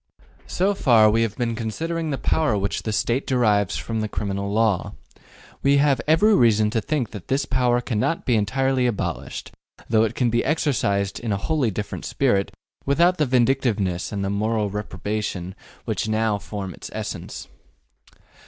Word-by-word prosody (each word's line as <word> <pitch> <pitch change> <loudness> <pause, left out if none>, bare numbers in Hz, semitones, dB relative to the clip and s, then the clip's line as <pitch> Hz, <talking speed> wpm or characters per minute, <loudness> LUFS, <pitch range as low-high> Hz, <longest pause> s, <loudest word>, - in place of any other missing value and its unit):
So 195 +3 +1
far 115 - +5
we 115 +2 +2
have 110 -2 -1
been 120 -2 -1
considering 160 +9 -3
the 140 - -1
power 140 -8 +1
which 100 0 -2
the 110 - -3
State 120 +5 0
derives 105 -6 +2
from 110 -1 -3
the 110 - -1
criminal 100 -1 -3
law. 110 -3 +1 0.7
We 140 +1 +4
have 140 -1 +3
every 185 +8 +5
reason 110 - +4
to 110 - 0
think 140 -2 -2
that 105 -5 -9
this 135 +1 0
power 125 -1 +1
cannot 130 - -1
be 125 - +2
entirely 130 +4 +1
abolished, 115 -4 -4 0.4
though 110 -1 +4
it 110 - -1
can 120 -3 +1
be 120 +1 +1
exercised 105 -10 0
in 115 -2 -3
a 100 - +1
wholly 145 +2 0
different 105 0 -5
spirit, 110 -8 +1 0.3
without 170 +6 +3
the 150 - +2
vindictiveness 120 -8 +1
and 100 -2 -2
the 95 - -1
moral 105 0 0
reprobation 105 -3 -4 0.3
which - - -2
now 110 -1 +1
form 100 -3 -6
its - - -9
essence. - - -6
115 Hz, 165 wpm, -23 LUFS, 105-135 Hz, 0.7 s, far